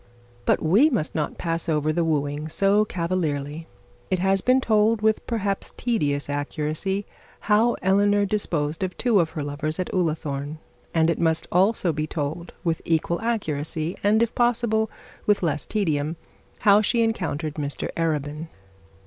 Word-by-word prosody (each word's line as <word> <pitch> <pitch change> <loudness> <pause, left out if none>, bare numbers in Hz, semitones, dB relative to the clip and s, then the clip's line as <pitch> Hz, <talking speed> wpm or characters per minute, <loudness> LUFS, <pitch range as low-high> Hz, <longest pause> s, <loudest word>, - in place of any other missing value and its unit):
But - - +2
we 205 - +5
must 210 - -1
not 150 -2 -2
pass 165 -1 -2
over 155 0 +1
the 170 - +1
wooing 150 -1 -1
so 200 +5 +3
cavalierly. 165 -4 -2 0.4
It 185 - +1
has 190 +1 +2
been 255 +4 +4
told, 215 -2 +2
with 220 0 +2
perhaps 205 -4 -2
tedious 145 - 0
accuracy, 155 +7 -2 0.4
how 220 +3 +3
Eleanor 205 +1 +3
disposed 165 -6 -1
of 185 -1 -3
two 235 -5 +3
of 165 -2 +2
her 150 - -1
lovers 145 +2 -3
at 185 - -3
Ullathorne; 155 -4 -1 0.3
and 165 0 +3
it - - -3
must 160 -1 +1
also 185 -1 +2
be 155 +1 -2
told 155 +3 -4
with 165 -2 0
equal 165 +1 0
accuracy, 160 -7 -2
and 215 +3 +4
if 230 - -2
possible 235 -2 +1 0.4
with 205 -2 +3
less 150 -3 -1
tedium, 160 -7 0 0.5
how 205 0 +6
she 230 +2 +2
encountered 160 -9 -2
Mr 145 -2 -4
Arabin. 155 -1 -2
170 Hz, 150 wpm, -24 LUFS, 155-205 Hz, 0.5 s, how